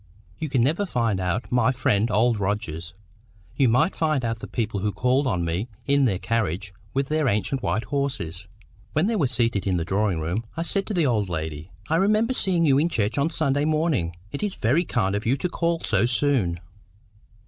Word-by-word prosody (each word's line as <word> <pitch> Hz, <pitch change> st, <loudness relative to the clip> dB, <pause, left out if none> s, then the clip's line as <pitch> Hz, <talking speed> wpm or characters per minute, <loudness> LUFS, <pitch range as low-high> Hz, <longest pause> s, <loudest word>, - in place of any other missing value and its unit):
You 155 Hz, -, -3 dB
can 130 Hz, -4 st, +2 dB
never 165 Hz, +10 st, +1 dB
find 115 Hz, -, 0 dB
out 90 Hz, +6 st, -2 dB
my 125 Hz, 0 st, +3 dB
friend 115 Hz, -4 st, +1 dB
Old 110 Hz, +1 st, +2 dB
Rogers; 85 Hz, -4 st, -3 dB, 0.6 s
you 135 Hz, -4 st, +3 dB
might 130 Hz, +10 st, +2 dB
find 155 Hz, -6 st, 0 dB
out 115 Hz, 0 st, -2 dB
the -, -, -7 dB
people 110 Hz, -4 st, -2 dB
who 105 Hz, +2 st, 0 dB
called 130 Hz, +5 st, +1 dB
on 90 Hz, -8 st, 0 dB
me 85 Hz, +7 st, -2 dB, 0.2 s
in 140 Hz, 0 st, +3 dB
their 100 Hz, -7 st, +1 dB
carriage 100 Hz, -3 st, -2 dB, 0.2 s
with 135 Hz, 0 st, -1 dB
the 155 Hz, 0 st, +1 dB
ancient 120 Hz, +4 st, 0 dB
white 110 Hz, -2 st, 0 dB
horses. 100 Hz, -, -3 dB, 0.5 s
When 155 Hz, +4 st, +2 dB
they 225 Hz, +2 st, +1 dB
were 155 Hz, -10 st, +2 dB
seated 115 Hz, -5 st, 0 dB
in 95 Hz, -2 st, +1 dB
the 80 Hz, -, -2 dB
drawing 100 Hz, -2 st, 0 dB
room, 85 Hz, +8 st, -2 dB
I 165 Hz, -, 0 dB
said 195 Hz, +4 st, -1 dB
to 210 Hz, -, -3 dB
the 170 Hz, -3 st, +2 dB
old 110 Hz, -7 st, +1 dB
lady— 80 Hz, 0 st, -4 dB, 0.2 s
"I 160 Hz, -, +2 dB
remember 215 Hz, +6 st, +2 dB
seeing 180 Hz, -8 st, +2 dB
you 140 Hz, -2 st, +4 dB
in 165 Hz, +3 st, +2 dB
church 115 Hz, -4 st, 0 dB
on 145 Hz, +4 st, +2 dB
Sunday 145 Hz, -3 st, +1 dB
morning. 150 Hz, -, 0 dB, 0.2 s
It 140 Hz, -, -5 dB
is 205 Hz, -2 st, -2 dB
very 145 Hz, +11 st, +2 dB
kind 100 Hz, -9 st, 0 dB
of 105 Hz, +2 st, -2 dB
you 130 Hz, +4 st, +2 dB
to 180 Hz, -, -1 dB
call 170 Hz, -1 st, -1 dB
so 120 Hz, -, +2 dB
soon." 120 Hz, -9 st, +1 dB
120 Hz, 205 wpm, -24 LUFS, 100-150 Hz, 0.6 s, you